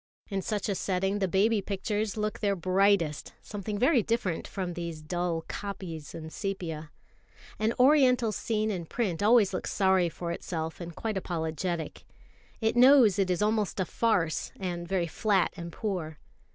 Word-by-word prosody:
In 195 -1 -1
such 205 0 -2
a 200 - 0
setting 195 +2 -1
the 190 - +1
baby 205 +4 +2
pictures 205 +2 -2
look 215 0 -2
their 200 -2 +1
brightest, 185 -3 +1
something 205 0 -5
very 255 +3 +4
different 225 -6 -1
from 185 -3 -4
these 170 -2 -5
dull 175 0 -2
copies 180 -7 -6
in 160 -1 -7
sepia. 165 -7 -4 0.7
An 220 +2 +1
Oriental 255 -4 +5
scene 215 0 -1
in 175 -4 -4
print 200 -7 -2
always 215 -1 +5
looks - - -3
sorry 190 -3 +3
for 170 +1 -5
itself, 165 -1 -4
and 170 -1 -7
quite 220 -3 -3
apologetic. 170 -1 -3 0.6
It 220 +1 +1
knows 245 -5 +7
it 190 -1 +2
is 180 +3 +1
almost 215 -2 0
a 190 - +1
farce, 180 -5 0
and 175 -2 -4
very 185 -2 0
flat 195 +2 +1
and 170 -2 -7
poor. 170 -6 -4
195 Hz, 160 wpm, -29 LUFS, 170-215 Hz, 0.7 s, knows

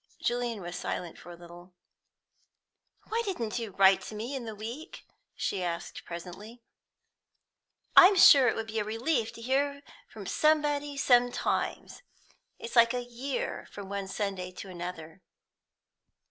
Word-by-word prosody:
Julian 240 -3 -2
was 175 +1 -6
silent 175 -2 -5
for - - -13
a 175 - -9
little. 175 +1 -14 1.3
"Why 455 +1 0
didn't 245 - -3
you 230 -2 -5
write 195 0 +5
to 215 - -8
me 235 +6 -5
in 255 -3 -5
the 220 -1 -6
week?" 235 - -8 0.3
she 195 - -2
asked 170 -1 -5
presently. 195 +7 -9 1.3
"I'm 385 +2 +9
sure 280 -8 +8
it - - +2
would 225 - -3
be 220 0 -3
a - - 0
relief 230 +3 -1
to 230 - -11
hear 280 +3 0 0.3
from 205 -3 -10
somebody 295 +2 +1
sometimes. 245 -2 +1 0.6
It's 230 - -8
like 235 +1 +5
a 245 - -2
year 245 +3 -4
from 200 -2 -9
one 200 -1 -4
Sunday 195 -2 -3
to 190 - -9
another." 175 -1 -8
225 Hz, 145 wpm, -29 LUFS, 190-260 Hz, 1.3 s, I'm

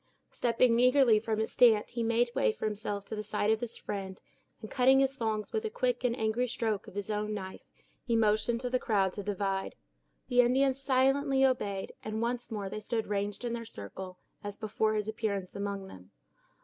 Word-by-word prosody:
Stepping 235 0 +2
eagerly 250 -3 +5
from 220 0 -2
his 220 0 -1
stand, 225 -4 +4
he 240 - -3
made 230 +1 +2
way 110 - +2
for - - -6
himself 205 -1 -3
to 220 - -5
the 210 - -3
side 210 0 0
of 220 - +2
his 240 -1 -4
friend; 190 -2 -5 0.4
and 215 - -9
cutting 260 +1 +5
his 270 0 +2
thongs 220 -4 -2
with 445 - 0
a 440 - -2
quick - - -1
and 245 -1 +1
angry 220 +2 0
stroke 220 -3 -2
of - - -12
his 205 +1 -3
own 210 0 -2
knife, 190 -2 -7 0.4
he 235 - 0
motioned 225 +1 +2
to 250 0 -3
the 255 - +2
crowd 195 -6 +1
to 205 - -4
divide. 195 -1 -2 0.5
The 245 0 +5
Indians 265 +2 +2
silently 270 +1 +3
obeyed, 205 -7 -1
and 215 0 -3
once 240 +1 -2
more 210 -4 -4
they 215 - -5
stood 220 +1 -2
ranged 205 +3 -3
in 235 - -2
their 235 0 -4
circle, 185 - -8 0.3
as 205 -1 -5
before 215 0 0
his 210 -1 -1
appearance 200 -4 -3
among 200 -1 -3
them. 95 - -13
220 Hz, 200 wpm, -30 LUFS, 205-245 Hz, 0.5 s, eagerly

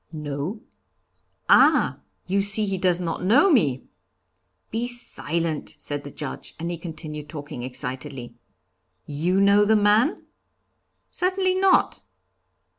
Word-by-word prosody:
'No.' 150 +6 -5 0.9
'Ah! - - +4 0.3
you 195 +2 +1
see 205 +2 +4
he 195 -2 -2
does 180 -1 +2
not 170 -1 -3
know 270 - +4
me!' 145 - +2 0.9
'Be 230 +2 -2
silent!' 170 -9 -3
said 145 -1 -5
the 145 - -8
Judge, 145 0 -7
and 170 +1 -4
he 170 - -4
continued 155 -3 -7
talking 145 -5 -7
excitedly: 130 0 -6 0.7
'You 170 +6 0
know 200 +1 +5
the 220 +2 +3
man?' 210 - +2 0.9
'Certainly 370 +1 0
not.' 375 0 +2
175 Hz, 115 wpm, -24 LUFS, 145-215 Hz, 0.9 s, know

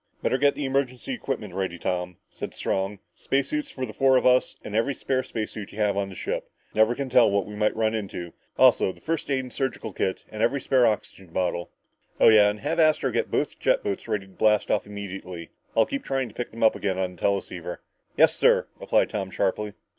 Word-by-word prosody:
"Better 130 - +1
get 145 0 +4
the 145 - -3
emergency 135 - -1
equipment 125 - -4
ready, 95 -2 -2
Tom," 90 0 -3
said - - -7
Strong. 95 +2 -1 0.2
"Space 135 0 -1
suits 300 -2 -2
for 130 - -4
the 110 - -9
four 135 +2 +4
of - - 0
us 125 0 +3
and 105 - -6
every 120 +5 +1
spare 130 0 0
space 110 -4 -4
suit 105 -2 -7
you - - -12
have 105 -2 +2
on 100 -1 -1
the 95 - -10
ship. - - -4 0.2
Never 110 +2 +4
can 140 +1 -3
tell 125 -3 +5
what 100 -2 +1
we 105 - -9
might 105 0 +1
run 110 0 +1
into. 95 -6 -5 0.2
Also - - +5
the - - -17
first 165 -2 -3
aid 130 -2 -1
surgical 130 -6 -3
kit 95 - -2
and 110 - -5
every 140 +4 +2
spare 130 -2 +3
oxygen 100 -3 -3
bottle. 85 0 -2 0.5
Oh, - - +8
yeah, 105 -2 +7
and 105 0 -5
have 165 +9 -1
Astro 155 -1 +3
get - - -1
both - - -1
jet - - +2
boats 405 -2 -3
ready 100 -2 -1
to 95 - -18
blast 105 +1 +2
off - - 0
immediately. 95 -4 -7 0.3
I'll 115 - +6
keep 280 -1 -4
trying 135 -2 -1
to - - -16
pick 120 - -4
them 115 - -5
up 110 - +6
again 95 -2 -2
on 90 -1 -2
the - - -20
teleceiver." 100 -1 -2 0.4
"Yes, - - +6
sir," - - +4
replied - - +2
Tom 95 -2 -3
sharply. 100 +3 -1
110 Hz, 225 wpm, -25 LUFS, 95-130 Hz, 0.5 s, Oh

